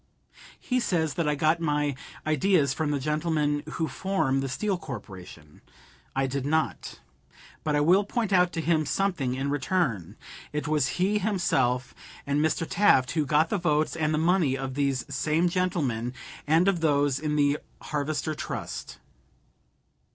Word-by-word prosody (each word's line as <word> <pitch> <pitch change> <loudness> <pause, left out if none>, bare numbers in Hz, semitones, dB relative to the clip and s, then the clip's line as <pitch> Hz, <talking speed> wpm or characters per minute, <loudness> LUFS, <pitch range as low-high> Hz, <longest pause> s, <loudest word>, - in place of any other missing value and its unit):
He 255 0 0
says 165 - 0
that 165 -3 0
I 150 - +1
got 155 +3 +2
my 150 -3 0 0.3
"ideas 155 -1 +2
from 155 0 -1
the 145 -1 0
gentlemen 150 0 0
who 160 - -1
form 150 -4 0
the 135 - -3
Steel 200 +9 -1
Corporation." 95 - -10 0.5
I 135 0 +1
did 135 0 -2
not. 160 +3 -1 0.6
But 150 -1 0
I 145 - +3
will 180 +7 +5
point 215 -1 -2
out 180 -1 +4
to 165 - -2
him 160 0 +2
something 145 -5 0
in 135 +2 -2
return. 135 - -1 0.4
It 150 0 -2
was 150 -3 +2
he 200 +4 +2
himself, 175 - 0 0.3
and 140 0 0
Mr. 155 +1 +1
Taft, 130 -11 +3
who 155 -3 0
got 155 +2 +3
the 205 - +1
votes 155 -3 +1
and 155 -2 0
the 155 - +1
money 160 -4 +2
of 135 -1 -4
these 140 -2 0
same 160 +3 +1
gentlemen, 150 - -1 0.3
and 165 +5 +4
of 195 -3 +2
those 145 -4 +2
in 150 -1 -1
the 145 0 +2 0.2
Harvester 150 +1 -2
Trust. - - -6
150 Hz, 160 wpm, -27 LUFS, 140-170 Hz, 0.6 s, will